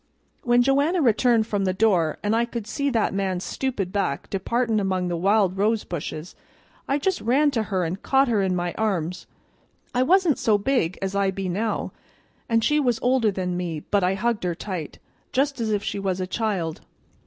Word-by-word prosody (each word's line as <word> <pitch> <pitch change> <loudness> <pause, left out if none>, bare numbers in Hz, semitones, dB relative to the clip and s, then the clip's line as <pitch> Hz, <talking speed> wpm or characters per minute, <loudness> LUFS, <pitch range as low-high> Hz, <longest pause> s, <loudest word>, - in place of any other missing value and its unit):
"When 240 0 +3
Joanna 285 +7 +2
returned 235 -3 +3
from 205 -3 -1
the 185 -1 0
door, 185 -7 +2
an' 205 +1 +1
I 230 +1 +3
could 235 -2 -5
see 280 +5 -1
that 230 -7 +1
man's 190 -2 -1
stupid 225 -9 -3
back 195 -9 -2
departin' 225 +3 0
among 185 -2 -1
the 175 - -1
wild 195 +1 +2
rose 215 +2 +2
bushes, 155 0 -6 0.5
I 275 - +1
just 370 +6 -1
ran 280 +6 +3
to 235 -5 0
her 195 -4 -1
an' 170 +3 -3
caught 270 +6 +2
her 220 -4 +2
in 190 -1 +1
my 175 -1 -2
arms. 180 -5 -1 0.7
I 250 - +2
wasn't 345 +2 +3
so 215 -2 +3
big 205 -6 0
as 190 0 -2
I 200 -1 +2
be 190 0 -3
now, 210 +5 -2 0.6
and 230 -1 +2
she 300 +4 +3
was 245 -5 +1
older 250 -3 +3
than 185 -2 -2
me, 170 -4 -3
but 205 -2 +3
I 185 +1 +2
hugged 230 +1 -1
her 175 -2 -1
tight, 175 -5 -6 0.4
just 275 -1 0
as 225 - -1
if 205 -1 0
she - - -3
was 190 -2 -1
a 185 - -1
child. 185 -5 -2
205 Hz, 200 wpm, -24 LUFS, 185-240 Hz, 0.7 s, When